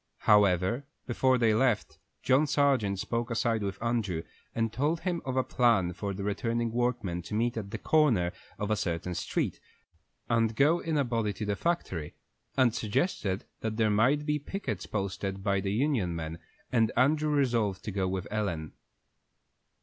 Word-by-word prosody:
However, 105 +5 +3 0.2
before 130 +1 +2
they 115 -3 +3
left, 115 -1 +1 0.2
John 135 +4 +4
Sargent 135 -9 +2
spoke 115 +5 -2
aside 115 -1 0
with 100 -1 -3
Andrew, 105 -9 -1 0.3
and 115 -1 0
told 155 +5 0
him 175 -3 -1
of 130 0 -2
a 130 - +3
plan 115 -10 +2
for 100 +3 -4
the 100 - -5
returning 115 +3 -1
workmen 120 -7 -1
to 85 - -6
meet 120 +2 +1
at 105 -3 -4
the 110 - -4
corner 115 - +3 0.3
of 105 +1 -2
a - - +4
certain 90 -2 -2
street, - - -2 0.7
and 115 -1 +2
go 150 +7 +4
in 160 -2 -1
a 140 - +3
body 115 -4 -1
to 105 +2 -5
the 105 0 0
factory, 100 - -2 0.4
and 130 -4 +4
suggested 105 - -1
that 110 -1 -3
there 110 -2 +3
might 130 +8 +3
be 150 0 0
pickets 145 - -4
posted 95 -1 -3
by 100 -1 +2
the 95 0 -2
union 110 - +1
men, 80 0 -5 0.3
and 115 -3 +3
Andrew 150 +4 +3
resolved 120 -9 +1
to 105 - -4
go 95 -1 0
with 95 0 -3
Ellen. 90 -8 -2
110 Hz, 170 wpm, -29 LUFS, 100-130 Hz, 0.7 s, John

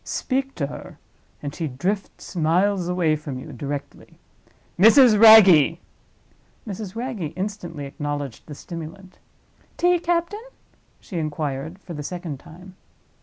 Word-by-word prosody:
Speak 270 0 -2
to 145 - -2
her—and 140 +1 -11
she 160 0 -3
drifts 185 +10 -4
miles 180 +3 +1
away 175 -3 +1
from 150 -3 -6
you 145 +3 -9
directly. 140 +2 -7 0.6
Mrs. 230 +3 +7
Wragge!" 190 -9 +8 0.9
Mrs. 205 -1 -6
Wragge 230 - -4
instantly 180 -6 -5
acknowledged 145 -3 -5
the 150 - -8
stimulant. 170 +4 -10 0.6
"Tea, 355 0 +3
captain?" 345 +5 -1 0.6
she 180 -6 -6
inquired, 155 +1 -4
for 190 -3 -10
the 150 - -6
second 165 -2 -6
time. 180 +6 -14
175 Hz, 120 wpm, -23 LUFS, 150-205 Hz, 0.9 s, Wragge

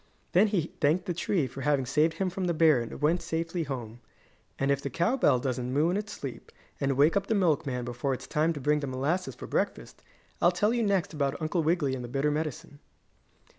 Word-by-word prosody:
Then 195 +5 +5
he 180 -6 -1
thanked 155 +7 +2
the 180 - -1
tree 170 -2 0
for 130 +2 -7
having 140 -1 +1
saved 150 +6 +2
him 185 +1 -1
from 190 +1 -3
the 170 -2 0
bear 155 -6 +5
and 115 +4 -7
went 165 +4 +3
safely 165 +2 -2
home. 120 -6 -5 0.6
And 135 +1 +1
if 140 0 +1
the 140 - -3
cow 170 - +1
bell 245 - +4
doesn't 125 -1 -2
moo 150 +6 +2
in - - 0
its 210 +1 -3
sleep, 135 - -7 0.3
and 135 -1 0
wake 150 +6 +4
up 200 0 0
the 225 - +1
milkman 145 -9 +1
before 120 +3 -2
it's - - -9
time 155 +1 +1
to 145 - -6
bring 150 +2 +2
the 140 - -4
molasses 145 +9 -1
for - - -8
breakfast, - - -3 0.4
I'll - - +5
tell 210 +2 +1
you 240 - +1
next 200 -6 +1
about 140 -2 -1
Uncle 165 +2 0
Wiggily 155 -4 +1
and 130 -2 -4
the - - -5
bitter 140 +4 0
medicine. 150 -1 -4
150 Hz, 225 wpm, -28 LUFS, 135-175 Hz, 0.6 s, Then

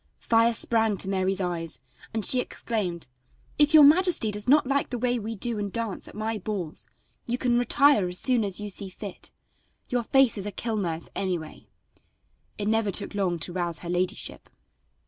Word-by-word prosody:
Fire 230 0 +2
sprang 225 -3 +1
to 190 - -1
Mary's 190 0 0
eyes 170 -3 -3 0.3
and 220 -2 -2
she 255 - +5
exclaimed: 195 - -3 0.5
"If 300 +1 +5
your 305 - +10
majesty 315 - +5
does 210 +3 -2
not 295 +1 +5
like 275 +1 0
the 245 - -3
way 245 0 0
we 225 +1 -5
do 230 +1 -1
and 205 -1 -3
dance 230 -3 -4
at - - -12
my 215 +1 -3
balls 185 -5 -5 0.4
you 240 +1 -1
can 245 -1 +1
retire 260 -5 +3
as 180 - -1
soon 250 0 +3
as 195 -2 -2
you 210 0 -5
see 195 0 -4
fit. 195 0 -9 0.6
Your 245 -1 0
face 250 -1 +3
is 200 - -5
a - - -4
kill 225 +2 -3
mirth 170 -5 -3
anyway." 180 -5 -4 0.9
It 205 - -3
never 220 -1 +1
took 195 - -3
long 190 -4 0
to 175 - +1
rouse 175 -2 -3
her - - -5
ladyship. 180 +1 -2
210 Hz, 185 wpm, -26 LUFS, 185-240 Hz, 0.9 s, your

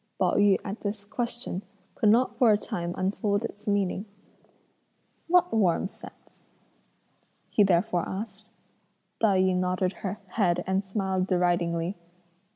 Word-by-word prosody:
Pao 185 - +2
yü 205 -2 +5
at 200 +1 -5
this 205 0 -4
question, 235 -3 -3 0.3
could 215 - +2
not 240 +4 +3
for 240 -4 +5
a 210 - +4
time 175 -3 -4
unfold 200 +3 0
its 210 0 -9
meaning: 200 -1 0 1.2
"What 360 +1 +3
'warm' 190 -3 +2
scent?" - - -15 1.1
he - - +3
therefore 180 -1 +2
asked. 210 +1 -6 0.7
Tai 200 -4 +3
yü 185 -1 +2
nodded 185 +1 0
her 195 +1 -3
head 180 -3 +1
and 190 +1 0
smiled 190 -2 -1
deridingly. 175 -1 0
195 Hz, 130 wpm, -27 LUFS, 180-210 Hz, 1.2 s, yü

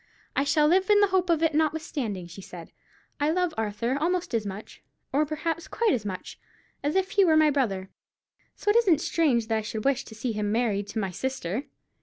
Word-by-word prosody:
"I 280 - +2
shall 295 +1 +3
live 375 +5 +3
in 415 -1 +6
the 410 -1 +4
hope 370 -1 +2
of 330 -1 +2
it, 320 -1 +2
notwithstanding," 295 - -1
she 175 +3 -10
said. 175 -3 -10 0.5
"I 290 +1 +2
love 355 0 +1
Arthur 225 +3 -1
almost 345 +3 -1
as 220 -3 0
much—or 220 +8 -4
perhaps 325 +2 -3
quite 455 -4 +1
as 225 -4 -2
much, 185 -2 -7 0.4
as 290 +3 -1
if 380 0 +1
he 400 - +4
were 320 -4 +4
my 310 -1 +5
brother—so 215 - -5
it 440 - +4
isn't 380 -10 +4
strange 275 -11 +2
that 220 0 0
I - - -3
should 215 0 -5
wish 275 -2 +2
to 220 - -11
see 230 +3 -2
him 210 -1 -2
married 215 -3 0
to 220 - -4
my 195 -3 -2
sister." 255 - -3
280 Hz, 205 wpm, -27 LUFS, 215-330 Hz, 0.5 s, in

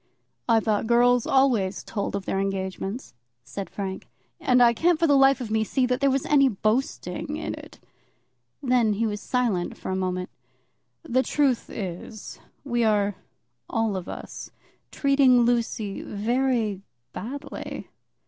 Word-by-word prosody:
"I 230 -1 +6
thought 215 0 0
girls 245 0 +4
always 240 -8 +2
told 200 -2 -3
of 200 -1 -4
their 195 - -1
engagements," 195 +3 -3 0.3
said 195 +8 -6
Frank, 190 -2 -5 0.3
"and 250 -1 +3
I 240 -1 +6
can't 335 +7 +2
for 330 - +2
the 290 -3 +4
life 270 0 +5
of 235 -4 -5
me 220 0 +2
see 255 +4 +1
that 250 +1 -1
there 275 - +4
was 270 0 0
any 275 -2 +5
boasting 225 +5 -1
in - - -4
it." - - -11 0.8
Then 245 -4 +3
he 225 +3 0
was 210 -2 -3
silent 230 -10 -1
for - - -5
a - - 0
moment. 185 -1 -2 0.7
"The 260 -5 +2
truth 270 -3 +1
is, 190 +2 -7 0.2
we 240 -4 0
are, 205 -2 +2 0.6
all 225 -3 0
of 185 -2 -5
us, - - -7 0.4
treating 275 -3 +4
Lucy 230 -3 0
very 225 -1 0 0.3
badly." 275 +6 -6
230 Hz, 150 wpm, -25 LUFS, 200-260 Hz, 0.8 s, I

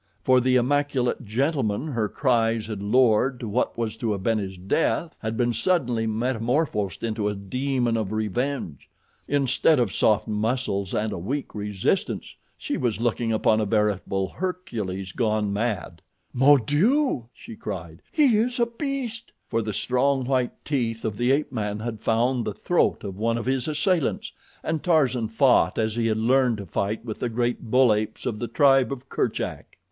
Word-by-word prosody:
For 130 -1 +4
the 130 +1 +2
immaculate 130 -1 +1
gentleman 130 +2 0
her 115 -6 -1
cries 115 -4 +1
had 105 -3 -5
lured 120 +3 +3
to 115 - -5
what 110 +4 -1
was 115 -2 -2
to 110 -3 -1
have 100 -2 -5
been 115 0 +2
his 95 -2 -5
death 160 - 0
had 110 0 -3
been 120 -1 +1
suddenly 120 - +1
metamorphosed 115 - -1
into 110 -2 -1
a 105 - -3
demon 120 +4 -1
of 110 -3 -2
revenge. 110 - -3 0.4
Instead 140 +2 +2
of 120 -6 0
soft 110 0 +2
muscles 105 -2 -1
and 105 0 -1
a - - -4
weak 130 +11 -4
resistance, 105 -2 -2 0.2
she - - -3
was 120 -4 -1
looking 120 0 0
upon 110 0 +2
a - - +1
veritable 100 -2 0
Hercules 110 - -4
gone 105 -2 0
mad. 100 -6 -2 0.3
"Mon 135 0 +5
Dieu!" 205 - +2
she 115 -1 -11
cried; 85 -6 -7
"he 270 -8 +4
is 245 +3 0
a 235 - +4
beast!" 240 -1 -4 0.2
For 115 -1 0
the 110 -1 -3
strong, 130 +5 +1
white 130 -1 -1
teeth 115 -6 -1
of 110 -2 -2
the 120 +4 +1
ape 145 +3 +1
man 105 -4 -2
had 110 -1 -5
found 120 +2 +1
the - - -4
throat - - +1
of 95 0 -6
one 115 +1 +1
of 115 - -4
his 130 +1 0
assailants, 155 +1 0 0.3
and 160 -1 -1
Tarzan 130 -9 +2
fought 115 -6 +3
as 110 -1 0
he 115 -1 +1
had 110 -1 +1
learned 125 +1 +3
to 100 - -7
fight 100 +6 -2
with 110 -3 -5
the 125 - -1
great 120 0 -2
bull 125 -1 +5
apes 105 +1 -3
of 115 -4 -2
the 120 - -3
tribe 135 +2 +4
of 135 0 -6
Kerchak. - - -3
115 Hz, 175 wpm, -25 LUFS, 105-135 Hz, 0.4 s, Mon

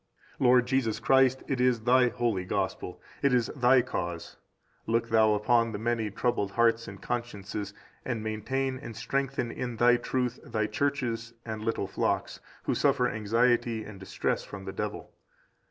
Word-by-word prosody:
Lord 125 -1 +5
Jesus 125 -4 0
Christ 130 +2 +3
it 130 -3 -1
is 125 -3 +3
Thy 125 +2 +4
holy 120 -6 -1
Gospel, 95 -1 -3 0.2
it 140 -3 +3
is 120 -2 +1
Thy 125 -1 +5
cause; 85 -8 -5 0.5
look 115 +1 +1
Thou 110 -1 +4
upon 115 +2 +2
the - - -2
many 115 0 -1
troubled 105 -2 -1
hearts 115 -1 +2
and 100 0 -9
consciences, 105 -4 -4 0.3
and 115 -4 -3
maintain 130 +5 -2
and 120 -4 -8
strengthen 135 0 -2
in 125 -1 -4
Thy 120 +1 +5
truth 125 0 -2
Thy 110 -2 -1
churches 120 -1 -2
and 110 -2 -5
little 115 -2 -1
flocks, - - -1 0.2
who - - 0
suffer 135 -3 +2
anxiety 115 +1 +1
and 105 -3 -10
distress 95 - -2
from 100 -1 -9
the 95 - -5
devil. - - -5
115 Hz, 155 wpm, -28 LUFS, 110-125 Hz, 0.5 s, Lord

